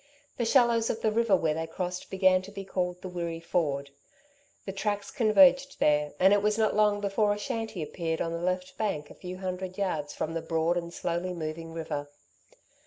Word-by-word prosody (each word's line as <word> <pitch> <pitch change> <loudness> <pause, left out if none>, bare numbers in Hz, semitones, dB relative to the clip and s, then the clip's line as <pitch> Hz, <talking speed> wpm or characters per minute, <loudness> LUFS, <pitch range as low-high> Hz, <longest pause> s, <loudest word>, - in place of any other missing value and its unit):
The 235 - 0
shallows 235 -2 +4
of 225 - -2
the 220 - +2
river 225 -2 +3
where 160 -4 +1
they 160 +1 -3
crossed 180 +2 -4
began 185 -1 +4
to 190 +2 -11
be 195 -1 -7
called 180 -1 -2
the - - -4
Wirree 170 -2 -4
Ford. 145 -5 -1 0.7
The 195 - -3
tracks 205 +1 -2
converged 270 +4 +4
there, 150 0 +2
and 190 +2 +6
it 205 - +4
was 210 +1 +1
not 220 -2 +2
long 210 -1 +3
before 205 +1 +2
a - - -7
shanty 220 -4 -3
appeared 165 +1 -3
on 165 - -1
the 170 0 -3
left 185 +1 -2
bank 155 -9 -2
a - - -9
few 180 0 -8
hundred 185 0 -4
yards 160 -7 -2
from 160 - -3
the 165 - -2
broad 165 +1 0
and 170 -1 -3
slowly 175 +2 -2
moving 165 0 -5
river. 155 -3 -4
185 Hz, 200 wpm, -28 LUFS, 165-205 Hz, 0.7 s, and